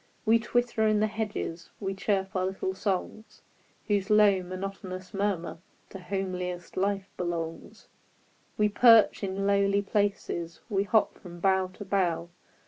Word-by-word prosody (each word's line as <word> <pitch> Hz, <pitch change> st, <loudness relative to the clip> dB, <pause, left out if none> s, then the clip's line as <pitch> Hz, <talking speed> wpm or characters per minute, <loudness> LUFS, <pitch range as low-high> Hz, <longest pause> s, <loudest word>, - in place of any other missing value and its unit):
We 230 Hz, +1 st, +5 dB
twitter 235 Hz, -1 st, +1 dB
in 215 Hz, -1 st, +3 dB
the 215 Hz, -, +3 dB
hedges; 210 Hz, -6 st, -4 dB
We 195 Hz, -2 st, -2 dB
chirp 195 Hz, 0 st, -1 dB
our 185 Hz, 0 st, +1 dB
little 190 Hz, 0 st, -3 dB
songs, 200 Hz, +2 st, -4 dB, 0.4 s
Whose 205 Hz, -1 st, 0 dB
low, 210 Hz, -3 st, +5 dB
monotonous 185 Hz, 0 st, -6 dB
murmur 195 Hz, -5 st, -2 dB, 0.3 s
To 195 Hz, -, -8 dB
homeliest 180 Hz, -2 st, -4 dB
life 195 Hz, 0 st, 0 dB
belongs; 170 Hz, -2 st, -5 dB, 0.7 s
We 210 Hz, -, +4 dB
perch 225 Hz, 0 st, +6 dB
in 195 Hz, 0 st, -2 dB
lowly 200 Hz, 0 st, +3 dB
places. 195 Hz, -5 st, -1 dB
We 200 Hz, -2 st, +1 dB
hop 210 Hz, +2 st, +2 dB
from 175 Hz, -2 st, -11 dB
bough 190 Hz, 0 st, +2 dB
to 205 Hz, -, -9 dB
bough. 180 Hz, -3 st, 0 dB
195 Hz, 135 wpm, -28 LUFS, 185-205 Hz, 0.7 s, perch